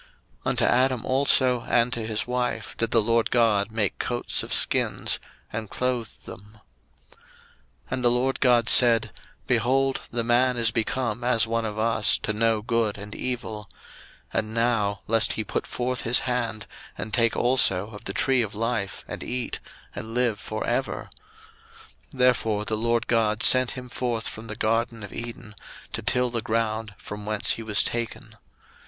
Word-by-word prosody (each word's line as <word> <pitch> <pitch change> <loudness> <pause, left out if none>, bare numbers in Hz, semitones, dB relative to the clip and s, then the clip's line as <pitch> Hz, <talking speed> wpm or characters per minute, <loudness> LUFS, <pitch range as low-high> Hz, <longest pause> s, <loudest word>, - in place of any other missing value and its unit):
01:003:021 - - -25 0.4
Unto - - +2
Adam 130 -1 +2
also 130 -2 +3
and 120 +1 +2
to 115 - -3
his 110 -1 -1
wife 125 0 -3
did 115 - -1
the 115 - +3
LORD 115 +1 +1
God 110 -4 +2
make 110 -3 -1
coats 120 0 -1
of - - -8
skins, - - +2 0.3
and 110 -1 -5
clothed 125 -3 -3
them. 105 +2 -12 0.5
01:003:022 - - -24 0.7
And 130 -1 -2
the - - +6
LORD 125 +2 0
God 120 -3 +4
said, 115 -3 +6 0.3
Behold, 135 +2 +1
the 120 -1 -2
man 120 +2 +2
is 115 -2 +3
become 115 0 -2
as 120 -2 +3
one 115 0 -1
of 105 -1 -5
us, 110 -1 +3
to 110 - -3
know 110 0 +1
good 115 -3 0
and 105 +1 -9
evil: 110 -5 -5 0.6
and 110 +1 -2
now, 115 -4 0
lest 115 0 +2
he 110 - -3
put - - -3
forth 125 +1 -2
his 115 +2 +3
hand, 115 -4 -2 0.3
and 110 - -6
take 115 -1 +2
also 110 -5 +3
of 105 -2 -11
the 100 - -3
tree 130 +3 +2
of 110 -2 -4
life, 110 -3 -3
and - - -7
eat, 125 -1 -4 0.3
and 115 +1 -7
live 120 -4 +1
for 110 +1 -5
ever: 130 +3 -2 1.0
01:003:023 140 - -14
Therefore 115 -4 +2
the 110 - -1
LORD 115 +1 0
God 110 -1 +1
sent 130 -1 +6
him 125 0 -7
forth 120 -2 -3
from 110 +1 -8
the 110 - -6
garden 115 0 -1
of 105 - -9
Eden, 115 -2 -8 0.4
to - - -2
till 125 -1 0
the 115 -1 -2
ground 110 -1 -2
from 105 0 -9
whence 110 -1 +2
he - - -2
was 110 -1 +2
taken. 120 -1 -4
115 Hz, 170 wpm, -25 LUFS, 110-125 Hz, 1.0 s, the